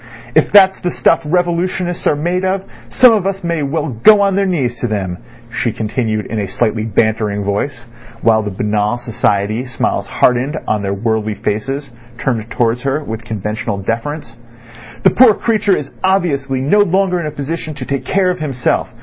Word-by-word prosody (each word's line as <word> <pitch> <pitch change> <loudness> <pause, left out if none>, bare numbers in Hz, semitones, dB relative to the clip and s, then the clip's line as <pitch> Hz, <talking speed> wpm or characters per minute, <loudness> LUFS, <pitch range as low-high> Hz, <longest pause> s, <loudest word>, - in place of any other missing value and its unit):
If - - +3
that's 190 -2 +6
the 180 - -2
stuff 165 0 +2
revolutionists 175 +2 -1
are - - +3
made 175 +5 -1
of 190 0 0 0.3
some 250 -2 +6
of 200 -3 +1
us 195 -1 -3
may 170 -2 -1
well 145 +2 -2
go 200 - +5
on 200 -1 +2
their 200 0 +1
knees 130 -10 -1
to 120 - -1
them," 95 -5 -3 0.4
she 120 -2 0
continued 110 -1 -2
in 110 - -3
a 100 - -2
slightly 110 +2 -1
bantering 105 -1 0
voice, 110 +6 -2 0.4
while 110 -1 +4
the 105 - -4
banal 105 +3 -1
society 110 -1 -1
smiles 125 -2 -2
hardened 130 +5 +1
on 105 -1 0
the 100 -1 -2
worldly 110 +1 -1
faces 135 +8 -3 0.3
turned 115 -3 -2
towards 120 0 0
her 140 +3 -1
with 110 -3 -6
conventional 105 -1 -3
deference. 115 +6 -4 0.7
"The - - +6
poor 230 -3 +6
creature 210 -4 +1
is 140 - -6
obviously 140 -9 +1
no 150 +10 +3
longer 190 -2 +2
in 160 - -3
a - - -4
position 155 +2 -5
to 135 -3 -6
take 140 0 -2
care 185 -1 +1
of 180 - -5
himself. 135 -5 -1
135 Hz, 180 wpm, -16 LUFS, 110-175 Hz, 0.7 s, that's